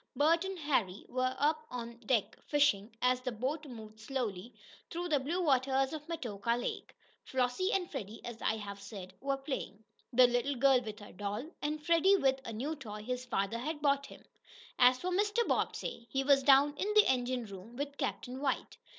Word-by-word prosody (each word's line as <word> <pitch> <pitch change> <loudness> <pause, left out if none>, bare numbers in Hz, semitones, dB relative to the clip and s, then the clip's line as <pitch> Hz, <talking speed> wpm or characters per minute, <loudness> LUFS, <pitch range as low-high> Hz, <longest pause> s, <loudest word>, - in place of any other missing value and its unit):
Bert 330 +4 +4
and 385 0 -4
Harry 235 - 0
were 255 +1 0
up 310 +2 +1
on 235 -1 -6
deck 235 -2 0
fishing, 280 -9 +3
as 250 0 +3
the 255 0 -2
boat 265 +8 -3
moved 220 -4 -10
slowly 230 -3 -3 0.4
through 350 +1 -4
the 295 -3 +3
blue 310 +7 -2
waters 270 -1 +2
of 300 -1 -6
Metoka 235 -9 -2
Lake. - - -5 0.3
Flossie 260 - 0
and 375 -2 +1
Freddie, 225 - -6
as 235 -2 -7
I 220 - +1
have 200 -1 -7
said, 200 -2 -8
were 275 0 0
playing, 265 -6 -5 0.3
the 250 +1 +7
little 245 +3 +1
girl 260 0 +5
with 215 -3 -7
her 205 - -11
doll, 205 - -4
and 300 +1 -3
Freddie 345 +4 +5
with 265 -5 +2
a - - -4
new 265 +9 -3
toy 210 -7 -8
his 250 +2 -3
father 200 +1 -1
had 300 +5 -3
bought 280 -1 +2
him. - - -14 0.5
As 250 0 +7
for 365 +7 -3
Mr. 415 +5 +2
Bobbsey, 235 0 -1
he 270 0 0
was 275 0 +5
down 280 +2 +6
in 410 +6 -1
the 425 - +8
engine 250 -1 0
room 200 +3 -10
with 285 +2 -5
"Captain 260 -2 -3
White." 275 -2 -1
260 Hz, 190 wpm, -33 LUFS, 230-295 Hz, 0.5 s, the